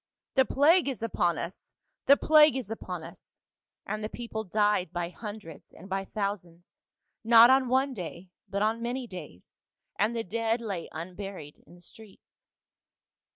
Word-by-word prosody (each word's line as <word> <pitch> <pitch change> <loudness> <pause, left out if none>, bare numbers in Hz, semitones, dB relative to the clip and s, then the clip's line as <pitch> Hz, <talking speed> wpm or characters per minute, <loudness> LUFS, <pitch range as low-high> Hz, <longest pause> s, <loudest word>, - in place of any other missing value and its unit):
" - - -64
* - - -65
The 265 -1 +4
plague 310 +6 +4
is 260 -4 -4
upon 175 -7 0
us! 170 +4 -8 0.3
the 280 - +7
plague 305 -2 +6
is 230 -5 -6
upon 225 - -6
us - - -14 0.2
!' - - -64
"And 215 0 -4
the 215 - -3
people 225 -2 -5
died 205 -3 +1
by 175 -1 -3
hundreds 205 -5 -10
and - - -13
by 195 0 -3
thou 200 0 -1
sands, 175 -3 -19 0.4
not 230 +2 +8
on 265 -1 +4
one 265 +2 +1
day 180 -2 -8 0.2
but 200 +1 -1
on 220 +2 0
many 245 +2 -3
days, 170 - -11 0.4
and 215 +3 +1
the 230 - -2
dead 225 +4 -1
lay 200 -7 -5
unburied 180 -2 -8
in - - -16
the 175 - -19
streets. 215 +2 -15
215 Hz, 175 wpm, -28 LUFS, 180-235 Hz, 0.4 s, not